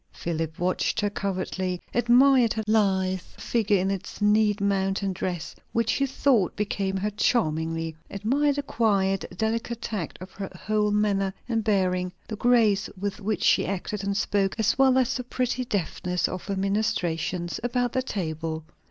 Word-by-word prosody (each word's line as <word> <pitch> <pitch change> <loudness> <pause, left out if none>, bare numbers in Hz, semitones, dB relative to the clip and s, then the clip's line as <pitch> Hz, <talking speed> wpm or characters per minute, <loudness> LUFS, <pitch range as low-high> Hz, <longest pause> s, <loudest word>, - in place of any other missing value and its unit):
Philip 160 -1 -3
watched 180 +1 0
her 205 -1 0
covertly; 185 -2 -2
admired 245 0 +5
her 220 - -2
lithe 190 -3 +2
figure 210 +2 0
in 190 +1 0
its 195 -2 -5
neat 210 0 +3
mountain 195 -1 0
dress, 180 -2 -4 0.2
which 230 -1 +2
he 275 - +1
thought 250 -8 +2
became 195 -2 -1
her 210 +2 -1
charmingly; 165 -7 0
admired 270 +9 +1
the 285 - -2
quiet, 195 -7 +1
delicate 230 +2 -1
tact 210 -8 -4
of 185 +1 -9
her 195 0 -6 0.2
whole 210 0 +2
manner 200 -2 +1
and 225 -2 0
bearing; 185 -3 +1 0.2
the 215 - -3
grace 220 -3 +3
with 200 +1 -3
which 210 +1 -1
she - - +4
acted 200 +1 -3
and 200 0 -1
spoke, 200 -2 +1
as 220 -1 +2
well 265 -1 +4
as 255 -2 +2
the 250 - -4
pretty 255 +1 -1
deftness 180 -3 -1
of 185 - -6
her 200 - -1
ministrations 180 -4 -1
about 245 0 0
the 260 - +1
table. 160 - -3
200 Hz, 160 wpm, -26 LUFS, 185-225 Hz, 0.2 s, admired